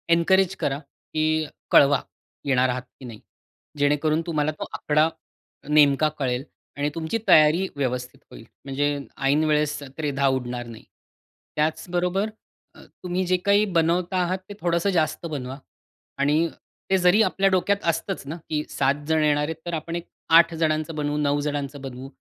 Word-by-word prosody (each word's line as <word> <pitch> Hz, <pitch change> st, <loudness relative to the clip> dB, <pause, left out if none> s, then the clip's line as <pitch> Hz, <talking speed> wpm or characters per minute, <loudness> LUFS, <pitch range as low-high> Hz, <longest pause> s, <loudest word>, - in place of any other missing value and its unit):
Encourage 190 Hz, +2 st, +3 dB
करा 140 Hz, 0 st, -1 dB
की 155 Hz, +1 st, -2 dB, 0.3 s
कळवा, 140 Hz, -1 st, +6 dB, 0.4 s
येणार 130 Hz, -2 st, +2 dB
आहात 125 Hz, +1 st, -2 dB, 0.2 s
की 130 Hz, -, -10 dB
नाही? 115 Hz, -3 st, -9 dB, 0.6 s
जेणेकरून 150 Hz, +2 st, +2 dB
तुम्हाला 155 Hz, -2 st, 0 dB
तो -, -, -3 dB
आकडा 155 Hz, +1 st, +2 dB, 0.6 s
नेमका 150 Hz, 0 st, +5 dB
कळेल 125 Hz, -2 st, -1 dB, 0.3 s
आणि 145 Hz, +1 st, 0 dB
तुमची 160 Hz, +6 st, -2 dB
तयारी 155 Hz, +5 st, +5 dB
व्यवस्थित 125 Hz, -2 st, -3 dB
होईल, 115 Hz, -, -12 dB, 0.2 s
म्हणजे 145 Hz, +1 st, 0 dB, 0.3 s
ऐन 145 Hz, +3 st, +3 dB
वेळेस 150 Hz, -1 st, +1 dB, 0.2 s
त्रेधा 140 Hz, -3 st, 0 dB
उडणार 120 Hz, -1 st, -5 dB
नाही. 115 Hz, -1 st, -11 dB, 0.7 s
त्याचबरोबर 180 Hz, +6 st, 0 dB, 0.5 s
अ, -, -, -15 dB, 0.2 s
तुम्ही 180 Hz, +1 st, -1 dB
जे 185 Hz, +1 st, +2 dB
काही 205 Hz, +1 st, +4 dB
बनवता 170 Hz, +3 st, +1 dB
आहात 185 Hz, +2 st, -1 dB
ते -, -, -6 dB
थोडंसं 170 Hz, +2 st, +1 dB
जास्त 155 Hz, 0 st, 0 dB
बनवा 135 Hz, -4 st, -5 dB, 0.6 s
आणि 155 Hz, +4 st, +3 dB, 0.4 s
ते 190 Hz, -, +5 dB
जरी 180 Hz, +4 st, +4 dB
आपल्या 195 Hz, -1 st, +2 dB
डोक्यात 190 Hz, +2 st, +2 dB
असतंच 165 Hz, +2 st, -2 dB
ना, 155 Hz, -, -4 dB
की 150 Hz, -1 st, -1 dB
7 140 Hz, +1 st, +1 dB
जण 160 Hz, -1 st, +2 dB
येणार 150 Hz, -1 st, +2 dB
आहेत, 160 Hz, -, -4 dB
तर 175 Hz, -, -4 dB
आपण 165 Hz, +1 st, -4 dB
एक 170 Hz, -, -3 dB, 0.3 s
8 170 Hz, 0 st, +5 dB
जणांचं 155 Hz, 0 st, 0 dB
बनवू, 145 Hz, 0 st, -1 dB
9 145 Hz, -1 st, +1 dB
जणांचं 145 Hz, -1 st, -3 dB
बनवू, 135 Hz, 0 st, -8 dB
155 Hz, 155 wpm, -24 LUFS, 140-170 Hz, 0.7 s, कळवा